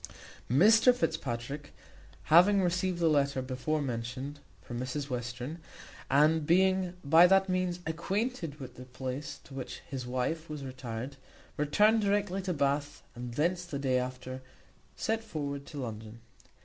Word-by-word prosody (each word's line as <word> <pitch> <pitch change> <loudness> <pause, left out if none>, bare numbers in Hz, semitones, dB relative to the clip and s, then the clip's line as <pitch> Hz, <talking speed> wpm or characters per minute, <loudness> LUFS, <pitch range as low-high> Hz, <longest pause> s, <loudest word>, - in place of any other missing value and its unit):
Mr 215 - +6
Fitzpatrick 140 - -3 0.5
having 190 +5 +6
received 180 0 0
the 170 -1 +2
letter 140 -3 +2
before 130 +4 -2
mentioned 130 +3 -4 0.2
from 120 0 -6
Mrs 135 +2 -4
Western, 125 +5 -4 0.5
and 150 +2 +4
being 185 +1 +3
by 165 +5 +8
that 195 +1 +4
means 185 -1 -1
acquainted 170 - -2
with 130 - -9
the 125 - -9
place 130 +3 -5
to 140 - -14
which 135 -1 -6
his 130 -3 -5
wife 130 +6 -2
was 150 -2 -5
retired, 130 0 -6 0.4
returned 210 +10 +3
directly 200 -1 +1
to 185 -1 -2
Bath, 145 -1 -1
and 120 -1 -7
thence 175 +5 +1
the 175 -5 -5
day 130 -2 +1
after 130 +1 -5 0.5
set 225 0 -1
forward 140 -8 -5
to 145 - -9
London. 110 -2 -6
145 Hz, 140 wpm, -30 LUFS, 130-180 Hz, 0.5 s, by